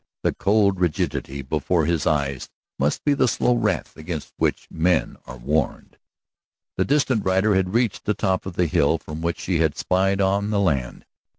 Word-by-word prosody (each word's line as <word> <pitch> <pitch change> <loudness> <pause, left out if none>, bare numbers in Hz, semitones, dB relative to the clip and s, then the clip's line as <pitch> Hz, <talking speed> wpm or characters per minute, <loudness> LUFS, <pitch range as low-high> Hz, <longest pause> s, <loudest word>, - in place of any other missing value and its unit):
The - - +1
cold 100 -2 +2
rigidity 70 -5 -1
before 80 +4 0
his 85 -2 0
eyes 70 -3 -1 0.3
must 70 +2 0
be 145 - +3
the 135 - +2
slow 125 - +2
wrath 120 - -1
against 80 -1 -6
which - - -1
men 85 +1 +1
are 65 - -8
warned. 70 +4 -2 0.8
The - - +1
distant 135 -6 +1
rider 95 +3 +2
had 95 +1 0
reached 120 -4 0
the 105 - +1
top 95 0 -1
of 90 - -7
the 90 - +2
hill 75 0 +2
from 75 0 -8
which 85 0 -2
she 90 -3 -1
had 80 -3 +1
spied 95 +1 +1
out 100 +1 +1
the 105 -1 +1
land. 70 -11 -1
90 Hz, 180 wpm, -23 LUFS, 75-100 Hz, 0.8 s, be